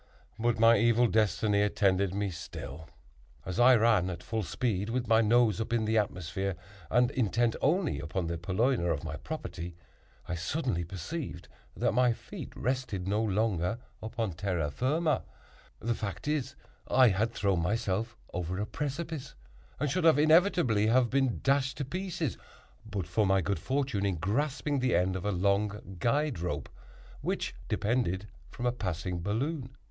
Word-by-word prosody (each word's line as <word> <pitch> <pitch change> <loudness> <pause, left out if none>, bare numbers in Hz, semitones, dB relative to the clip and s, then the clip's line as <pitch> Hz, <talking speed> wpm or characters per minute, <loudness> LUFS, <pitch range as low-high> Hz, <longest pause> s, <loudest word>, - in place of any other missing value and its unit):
But 120 0 +1
my 115 -1 +6
evil 115 +2 +4
destiny 105 -2 +2
attended 100 -2 +2
me 100 0 -1
still. 80 -1 -8 0.6
As 95 +4 -3
I 125 +1 +8
ran 110 -5 +3
at 90 -1 -6
full 110 -1 -2
speed, 100 +2 -1
with 120 0 -1
my 115 0 +5
nose 115 -2 +3
up 110 - -4
in 115 -2 +1
the 110 +1 +3
atmosphere, 95 -1 -2 0.3
and 125 +1 +3
intent 120 -1 +1
only 155 - +1
upon 80 +4 -3
the 85 0 -3
purloiner 95 +3 +1
of 75 -3 -2
my 75 -2 -4
property, 85 +4 -6 0.5
I 90 - -3
suddenly 90 - -1
perceived 90 - -6 0.3
that - - +2
my 125 -1 +3
feet - - -9
rested 125 -7 -2
no 105 +2 +1
longer 105 -2 0 0.2
upon 110 -2 -2
terra 85 -4 -2
firma; 150 - +1 0.6
the 115 +1 0
fact 105 +3 -5
is, 150 -4 -1 0.3
I 130 -2 +6
had 105 +4 +1
thrown 100 -5 +1
myself 110 +4 -1 0.2
over 90 0 -3
a 105 - 0
precipice, 150 - -4 0.4
and 150 - +1
should 165 +5 0
inevitably 155 - +5
have 120 0 +3
been 135 -3 +1
dashed 135 -1 +2
to 140 - -2
pieces 175 - -3 0.4
but 105 -5 -4
for 100 +4 +1
my 95 0 +4
good 100 +3 -1
fortune 130 -7 0
in 95 - 0
grasping 140 - -1
the 125 -5 +2
end 90 +2 +2
of 95 - -4
a 105 - +1
long 100 +1 0
guide 140 - +1
rope, 90 +1 -3 0.5
which - - -2
depended 105 -4 0 0.2
from 120 - -6
a 120 - +3
passing 90 -5 -3
balloon. 130 - -2
110 Hz, 160 wpm, -30 LUFS, 95-130 Hz, 0.6 s, I